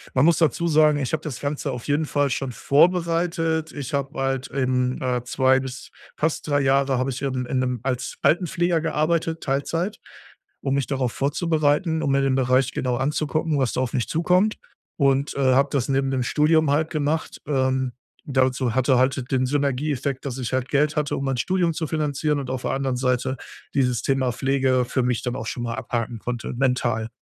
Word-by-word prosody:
man 130 Hz, +2 st, +4 dB
muss 165 Hz, -1 st, +4 dB
dazu 170 Hz, +2 st, +2 dB
sagen, 155 Hz, -1 st, +4 dB
ich 135 Hz, +2 st, -3 dB
habe 155 Hz, -, 0 dB
das 140 Hz, -6 st, -5 dB
Ganze 145 Hz, 0 st, -3 dB
auf 125 Hz, -2 st, -6 dB
jeden 145 Hz, +2 st, +1 dB
Fall 145 Hz, -1 st, +1 dB
schon 135 Hz, 0 st, -2 dB
vorbereitet. 165 Hz, +2 st, +1 dB
Ich 140 Hz, -3 st, -6 dB
habe 140 Hz, +1 st, -2 dB
halt 135 Hz, -1 st, -1 dB
eben, 130 Hz, -1 st, 0 dB
äh, 125 Hz, -2 st, 0 dB
2 130 Hz, +1 st, +3 dB
bis 130 Hz, -1 st, -7 dB, 0.2 s
fast 160 Hz, +1 st, -1 dB
3 145 Hz, -1 st, +2 dB
Jahre 135 Hz, 0 st, +2 dB
habe 130 Hz, +2 st, 0 dB
ich 130 Hz, -, -6 dB
eben 130 Hz, -2 st, -2 dB
in 130 Hz, +1 st, -1 dB
'nem 125 Hz, -2 st, -1 dB
als 125 Hz, -2 st, -3 dB
Altenpfleger 175 Hz, -1 st, +2 dB
gearbeitet, 165 Hz, 0 st, 0 dB
Teilzeit, 165 Hz, +8 st, -1 dB, 0.6 s
um 135 Hz, -1 st, -1 dB
mich 140 Hz, -2 st, 0 dB
darauf 130 Hz, -4 st, -1 dB
vorzubereiten. 160 Hz, +2 st, +1 dB
Um 140 Hz, -, 0 dB
mir 140 Hz, -, +3 dB
den 135 Hz, -1 st, +2 dB
Bereich 130 Hz, 0 st, +2 dB
genau 125 Hz, -1 st, -1 dB
anzugucken, 150 Hz, +2 st, 0 dB
was 130 Hz, -3 st, 0 dB
da 130 Hz, -, 0 dB
auf 125 Hz, -, -2 dB
mich 120 Hz, -, 0 dB
zukommt 180 Hz, +6 st, +2 dB, 0.4 s
und, 140 Hz, -1 st, +2 dB
äh, 130 Hz, -2 st, +3 dB
habe 140 Hz, +1 st, +3 dB
das 135 Hz, -2 st, 0 dB
neben 135 Hz, 0 st, +1 dB
dem 130 Hz, -2 st, 0 dB
Studium 155 Hz, +2 st, +3 dB
halt 155 Hz, +2 st, +1 dB
gemacht. 155 Hz, 0 st, -2 dB
Ähm, 130 Hz, -2 st, +1 dB, 0.4 s
dazu 130 Hz, -2 st, +1 dB
hatte 130 Hz, 0 st, +3 dB
halt, 130 Hz, 0 st, 0 dB
den 130 Hz, -1 st, +2 dB
Synergieeffekt, 140 Hz, 0 st, -1 dB
dass 135 Hz, -2 st, -4 dB
ich 125 Hz, -2 st, -4 dB
halt 130 Hz, 0 st, 0 dB
Geld 150 Hz, +1 st, +1 dB
hatte, 150 Hz, -2 st, 0 dB
um 140 Hz, -, -3 dB
mein 135 Hz, -2 st, -1 dB
Studium 180 Hz, +2 st, +1 dB
zu 160 Hz, -1 st, -3 dB
finanzieren 150 Hz, -1 st, -1 dB
und 135 Hz, -2 st, -5 dB
auf 130 Hz, -1 st, -3 dB
der -, -, -1 dB
anderen 135 Hz, -1 st, -1 dB
Seite 125 Hz, 0 st, 0 dB, 0.4 s
dieses 125 Hz, -4 st, +1 dB
Thema 130 Hz, -2 st, 0 dB
Pflege 130 Hz, -1 st, +1 dB
für 130 Hz, +1 st, -1 dB
mich 125 Hz, -2 st, 0 dB
dann 125 Hz, -1 st, -2 dB
auch 115 Hz, -, -5 dB
schon 120 Hz, -, -4 dB
mal 115 Hz, -1 st, -3 dB
abhaken 115 Hz, -1 st, -3 dB
konnte, 120 Hz, +2 st, -4 dB
mental. 125 Hz, -3 st, 0 dB
135 Hz, 195 wpm, -23 LUFS, 130-150 Hz, 0.6 s, man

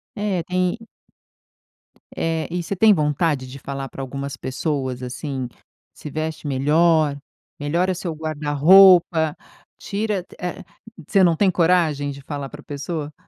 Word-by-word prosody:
É 200 Hz, -5 st, -1 dB
tem 180 Hz, +4 st, -1 dB, 1.4 s
É, 165 Hz, -1 st, -1 dB
e 175 Hz, -1 st, -2 dB
você 200 Hz, -, -3 dB
tem 215 Hz, +3 st, +6 dB
vontade 150 Hz, -3 st, 0 dB
de 135 Hz, +2 st, -10 dB
falar 135 Hz, 0 st, -5 dB
para 135 Hz, -, -8 dB
algumas 140 Hz, +1 st, -5 dB
pessoas, 130 Hz, -2 st, -3 dB
assim, 130 Hz, 0 st, -4 dB, 0.5 s
"Se 150 Hz, -, -9 dB
veste 155 Hz, +1 st, -4 dB
melhor, 150 Hz, +2 st, +2 dB, 0.4 s
melhora 170 Hz, +6 st, 0 dB
seu 170 Hz, -2 st, -4 dB
guarda-roupa, 160 Hz, +2 st, +5 dB, 0.4 s
tira 205 Hz, -2 st, -2 dB
t -, -, -18 dB
eh", 180 Hz, 0 st, -5 dB, 0.4 s
você 195 Hz, -2 st, +4 dB
não 170 Hz, -2 st, +4 dB
tem 190 Hz, +1 st, +3 dB
coragem 165 Hz, -5 st, +2 dB
de 140 Hz, 0 st, -10 dB
falar 140 Hz, -1 st, -6 dB
para -, -, -11 dB
a -, -, -23 dB
pessoa? 150 Hz, +1 st, -5 dB
155 Hz, 140 wpm, -22 LUFS, 140-180 Hz, 1.4 s, tem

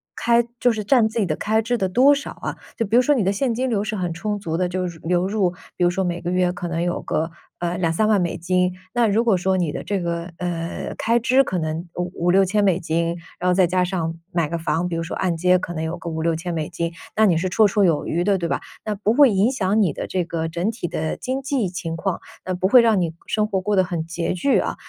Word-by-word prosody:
开 235 Hz, 0 st, +3 dB
就 245 Hz, -1 st, +4 dB
是 215 Hz, -1 st, -3 dB
占 235 Hz, -2 st, +4 dB
自 230 Hz, -, -3 dB
己 210 Hz, -, +2 dB
的 155 Hz, -4 st, -1 dB
开 220 Hz, +1 st, +1 dB
支 240 Hz, +2 st, -1 dB
的 190 Hz, -3 st, 0 dB
多 265 Hz, +8 st, +5 dB
少 280 Hz, -, -5 dB
啊。 -, -, -6 dB, 0.2 s
就 230 Hz, -, 0 dB
比 215 Hz, +4 st, 0 dB
如 250 Hz, -, +7 dB
说， 295 Hz, +3 st, +3 dB
你 235 Hz, -7 st, +1 dB
的 195 Hz, -, +2 dB
现 235 Hz, +4 st, 0 dB
金 255 Hz, +3 st, -1 dB
流 210 Hz, -4 st, 0 dB
是 215 Hz, 0 st, -3 dB
很 175 Hz, -3 st, -2 dB
充 205 Hz, +4 st, -3 dB
足 165 Hz, -5 st, -3 dB
的， 180 Hz, +1 st, 0 dB
就 185 Hz, 0 st, -2 dB, 0.2 s
流 180 Hz, +2 st, +1 dB
入 195 Hz, -4 st, +1 dB, 0.2 s
比 -, -, 0 dB
如 175 Hz, -, +5 dB
说 190 Hz, +2 st, -1 dB
每 175 Hz, -1 st, -2 dB
个 175 Hz, +1 st, -3 dB
月 180 Hz, -1 st, +2 dB
可 180 Hz, -1 st, -5 dB
能 170 Hz, 0 st, -2 dB
有 175 Hz, 0 st, -1 dB
个， 160 Hz, +2 st, -1 dB, 0.3 s
呃， 175 Hz, 0 st, -2 dB
20000-30000 190 Hz, +4 st, +2 dB
美 170 Hz, -, -1 dB
金， 180 Hz, +1 st, +1 dB, 0.2 s
那 240 Hz, -2 st, +3 dB
如 215 Hz, +3 st, +2 dB
果 225 Hz, -5 st, +3 dB
说 190 Hz, +1 st, +1 dB
你 170 Hz, -5 st, 0 dB
的 -, -, -5 dB
这 200 Hz, -2 st, -1 dB
个， 170 Hz, 0 st, -3 dB
呃， 170 Hz, -2 st, -4 dB
开 230 Hz, +1 st, +2 dB
支 260 Hz, +3 st, +4 dB
可 185 Hz, -, -3 dB
能 160 Hz, +2 st, -3 dB
5 180 Hz, 0 st, -3 dB
5000-6000 195 Hz, +3 st, +3 dB
美 185 Hz, -2 st, +3 dB
金， 170 Hz, +1 st, -1 dB, 0.2 s
然 180 Hz, +1 st, +1 dB
后 -, -, +4 dB
再 185 Hz, 0 st, +4 dB
加 180 Hz, +1 st, +1 dB
上 175 Hz, -3 st, -2 dB, 0.2 s
买 170 Hz, -3 st, +1 dB
个 170 Hz, -, -2 dB
房 165 Hz, +2 st, 0 dB
比 170 Hz, -, -3 dB
如 165 Hz, -, -1 dB
说 165 Hz, -, -5 dB
按 180 Hz, -3 st, 0 dB
揭 180 Hz, +2 st, +4 dB
可 175 Hz, -1 st, -5 dB
能 160 Hz, -, -4 dB
有 160 Hz, +1 st, -3 dB
个 170 Hz, -, -6 dB
5000-6000 165 Hz, +2 st, -2 dB
美 155 Hz, -2 st, -2 dB
金， 170 Hz, 0 st, -3 dB, 0.2 s
那 220 Hz, -, +5 dB
你 175 Hz, -6 st, +3 dB
是 185 Hz, +2 st, -1 dB
绰 215 Hz, +4 st, +4 dB
绰 200 Hz, +1 st, +2 dB
有 160 Hz, -4 st, +1 dB
余 175 Hz, +2 st, 0 dB
的， 200 Hz, -1 st, +3 dB
对 170 Hz, -1 st, -3 dB
吧？ -, -, 0 dB, 0.2 s
那 215 Hz, -, -2 dB
不 210 Hz, +2 st, 0 dB
会 275 Hz, -3 st, +6 dB
影 205 Hz, +6 st, +3 dB
响 215 Hz, -3 st, +1 dB
你 170 Hz, -8 st, +2 dB
的， -, -, -4 dB
这 185 Hz, -2 st, -1 dB
个 165 Hz, -1 st, -3 dB
整 170 Hz, +5 st, -1 dB
体 225 Hz, -6 st, -4 dB
的 155 Hz, +1 st, -2 dB
经 260 Hz, +1 st, -3 dB
济 265 Hz, -7 st, -1 dB
情 165 Hz, -2 st, -4 dB
况， 185 Hz, +1 st, -2 dB, 0.3 s
那 185 Hz, -, -2 dB
不 185 Hz, +1 st, 0 dB
会 245 Hz, +4 st, +7 dB
让 225 Hz, -4 st, +3 dB
你 165 Hz, -2 st, -1 dB
生 215 Hz, -1 st, 0 dB
活 195 Hz, -3 st, -1 dB
过 205 Hz, +2 st, 0 dB
得 185 Hz, -, +5 dB
很 175 Hz, -3 st, -3 dB
拮 165 Hz, +1 st, -2 dB
据 185 Hz, +10 st, +2 dB
啊。 -, -, -2 dB
185 Hz, 280 characters per minute, -22 LUFS, 170-215 Hz, 0.3 s, 如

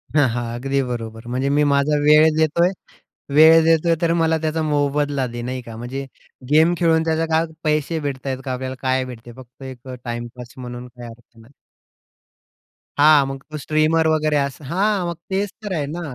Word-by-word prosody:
हां, 145 Hz, -3 st, +5 dB
हां, 120 Hz, 0 st, -3 dB
अगदी 135 Hz, +2 st, -1 dB
बरोबर. 115 Hz, -2 st, -6 dB
म्हणजे 130 Hz, +3 st, -1 dB
मी 145 Hz, +1 st, +2 dB
माझा 140 Hz, +1 st, +2 dB
वेळ 150 Hz, +1 st, +6 dB
देतोय 160 Hz, +3 st, +3 dB, 0.7 s
वेळ 160 Hz, +1 st, +7 dB
देतोय, 165 Hz, +1 st, +3 dB
तर 170 Hz, -1 st, +2 dB
मला 160 Hz, 0 st, +2 dB
त्याचा 160 Hz, 0 st, -1 dB
मोबदला 145 Hz, -2 st, 0 dB
दे, 120 Hz, 0 st, -7 dB
नाही 125 Hz, +1 st, -4 dB
का? 115 Hz, -2 st, -10 dB
म्हणजे 130 Hz, +4 st, -5 dB, 0.5 s
गेम 160 Hz, +3 st, +5 dB
खेळून 160 Hz, -1 st, +3 dB
त्याचा 160 Hz, 0 st, 0 dB
काय 160 Hz, +1 st, +2 dB, 0.2 s
पैसे 155 Hz, +1 st, 0 dB
भेटत 140 Hz, -2 st, -5 dB
आहेत 130 Hz, -1 st, -2 dB
का? 130 Hz, -, -2 dB
आपल्याला 130 Hz, +1 st, -5 dB
काय 130 Hz, 0 st, 0 dB
भेटते? 120 Hz, -1 st, -10 dB
फक्त 130 Hz, +1 st, -14 dB
एक 130 Hz, 0 st, -10 dB, 0.2 s
टाईमपास 120 Hz, +1 st, -7 dB
म्हणून 125 Hz, -1 st, -8 dB
काही 120 Hz, -1 st, -11 dB
अर्थ 120 Hz, 0 st, -17 dB
नाही. 120 Hz, +5 st, -19 dB, 1.5 s
हां, 150 Hz, -1 st, +6 dB
मग 135 Hz, 0 st, -7 dB
तो 155 Hz, -, -5 dB
स्ट्रीमर 155 Hz, +3 st, +1 dB
वगैरे 155 Hz, -1 st, +1 dB
असं. 140 Hz, +1 st, -3 dB
हां, 195 Hz, -1 st, +1 dB
मग 170 Hz, -, -4 dB
तेच 195 Hz, +1 st, -1 dB
तर 200 Hz, -3 st, -4 dB
आहे 150 Hz, -3 st, -1 dB
ना. 175 Hz, -, -5 dB
140 Hz, 180 wpm, -21 LUFS, 125-160 Hz, 1.5 s, वेळ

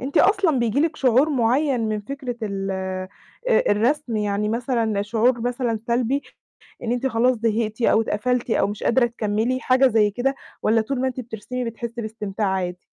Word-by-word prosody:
أنتِ 270 Hz, +3 st, -1 dB
أصلًا 380 Hz, -8 st, +4 dB
بييجي 235 Hz, +2 st, +1 dB
لكِ 315 Hz, 0 st, +1 dB
شعور 260 Hz, +3 st, +3 dB
معيّن 260 Hz, +1 st, +2 dB
من 215 Hz, -1 st, -1 dB
فكرة 255 Hz, +2 st, -6 dB
ال 195 Hz, -2 st, -3 dB
آآ 190 Hz, 0 st, -4 dB, 0.6 s
الرسم، 240 Hz, +3 st, 0 dB
يعني 210 Hz, 0 st, 0 dB
مثلًا 230 Hz, -3 st, 0 dB
شعور 230 Hz, +3 st, +1 dB
مثلًا 240 Hz, -1 st, -1 dB
سلبي 245 Hz, +4 st, +1 dB, 0.6 s
إن 235 Hz, 0 st, -1 dB
أنتِ 245 Hz, +2 st, -1 dB
خلاص 250 Hz, +1 st, +2 dB
زهقتِ 220 Hz, 0 st, -1 dB
أو 225 Hz, -, +4 dB
اتقفلتِ 245 Hz, +3 st, -1 dB
أو -, -, +3 dB
مش 205 Hz, +1 st, -6 dB
قادرة 240 Hz, 0 st, +3 dB
تكملي، 230 Hz, +2 st, -1 dB
حاجة 260 Hz, +1 st, +4 dB
زي 210 Hz, -3 st, +3 dB
كده؟ 255 Hz, +6 st, -1 dB, 0.3 s
والّا 225 Hz, +1 st, +3 dB
طول 250 Hz, +4 st, -2 dB
ما 260 Hz, -, +1 dB
أنتِ 255 Hz, 0 st, -5 dB
بترسمي 245 Hz, +2 st, -5 dB
بتحسي 235 Hz, +1 st, -5 dB
باستمتاع 215 Hz, -1 st, -3 dB
عادي؟ 180 Hz, -2 st, -2 dB
235 Hz, 170 wpm, -23 LUFS, 215-255 Hz, 0.6 s, أصلًا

